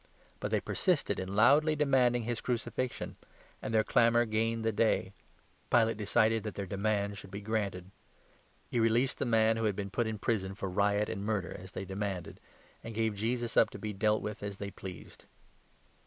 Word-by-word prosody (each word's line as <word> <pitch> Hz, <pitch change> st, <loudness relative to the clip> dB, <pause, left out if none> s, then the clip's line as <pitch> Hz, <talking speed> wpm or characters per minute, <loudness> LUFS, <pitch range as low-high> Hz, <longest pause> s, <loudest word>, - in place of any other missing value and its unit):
But -, -, -3 dB
they -, -, +2 dB
persisted 165 Hz, -, 0 dB
in 95 Hz, +1 st, -4 dB
loudly 145 Hz, +8 st, +5 dB
demanding 130 Hz, -5 st, +3 dB
his 120 Hz, +1 st, -2 dB
crucifixion; 125 Hz, +1 st, -3 dB, 0.4 s
and -, -, -4 dB
their 110 Hz, -1 st, +3 dB
clamour 120 Hz, +1 st, +4 dB
gained 115 Hz, +1 st, 0 dB
the 110 Hz, -, +3 dB
day. 105 Hz, -2 st, +1 dB, 0.6 s
Pilate 115 Hz, -1 st, +4 dB
decided 110 Hz, +1 st, +2 dB
that 105 Hz, -1 st, -6 dB
their 100 Hz, -, -3 dB
demand 100 Hz, +1 st, -1 dB
should -, -, -11 dB
be 100 Hz, +2 st, -6 dB
granted. 100 Hz, -4 st, -3 dB, 0.8 s
He 120 Hz, -, -1 dB
released 115 Hz, +3 st, +2 dB
the -, -, 0 dB
man 110 Hz, -1 st, +3 dB
who 115 Hz, -, 0 dB
had 105 Hz, -3 st, +1 dB
been 100 Hz, -1 st, -4 dB
put 120 Hz, +1 st, 0 dB
in 110 Hz, -1 st, -3 dB
prison 95 Hz, -2 st, -1 dB
for 95 Hz, -, -4 dB
riot 100 Hz, +2 st, +2 dB
and 100 Hz, -, -4 dB
murder, 105 Hz, -4 st, -2 dB
as 95 Hz, +1 st, -10 dB
they 95 Hz, -, -4 dB
demanded, 95 Hz, -2 st, -4 dB, 0.4 s
and 115 Hz, -1 st, -7 dB
gave 110 Hz, -1 st, +1 dB
Jesus 115 Hz, +3 st, -2 dB
up -, -, +5 dB
to -, -, -9 dB
be 105 Hz, -1 st, -4 dB
dealt 105 Hz, +2 st, +1 dB
with 105 Hz, 0 st, -5 dB
as 100 Hz, -1 st, -5 dB
they 100 Hz, 0 st, -5 dB
pleased. 95 Hz, -4 st, -10 dB
110 Hz, 185 wpm, -31 LUFS, 100-115 Hz, 0.8 s, loudly